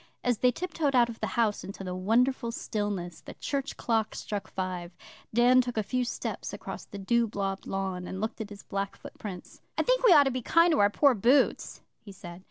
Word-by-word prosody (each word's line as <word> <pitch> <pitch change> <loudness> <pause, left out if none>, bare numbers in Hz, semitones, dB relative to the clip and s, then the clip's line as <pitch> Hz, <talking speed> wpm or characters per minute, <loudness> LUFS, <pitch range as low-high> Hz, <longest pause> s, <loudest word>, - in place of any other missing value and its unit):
As 245 -3 +1
they 250 - +5
tiptoed 320 -1 -1
out 240 -1 +5
of 230 - -8
the 215 - -1
house 220 -3 +1
into 195 0 -8
the 180 -1 -4
wonderful 230 +6 +1
stillness, 205 -7 -3
the - - -10
church 280 -1 -3
clock 225 -2 0
struck 205 -2 -4
five. 180 -2 -5 0.3
Dan 245 +3 +5
took 245 -2 -5
a 215 - +2
few 250 +4 -1
steps 235 - -4
across - - -7
the 200 - -9
dew 235 +4 +1
blobbed 195 -2 -3
lawn, 190 -2 -3
and 190 - -5
looked 220 +2 -3
at 210 - -5
his 205 -1 -11
black 195 0 -3
footprints. 185 -4 -9 0.2
'I - - +2
think - - +2
we 485 - +7
ought 295 -4 +8
to 270 - 0
be 255 0 -3
kind 335 +7 +4
to 310 - +2
our 205 - +5
poor 280 +6 +4
boots,' 250 +6 +2 0.2
he 205 - -12
said. 175 -2 -10
220 Hz, 215 wpm, -28 LUFS, 195-250 Hz, 0.3 s, ought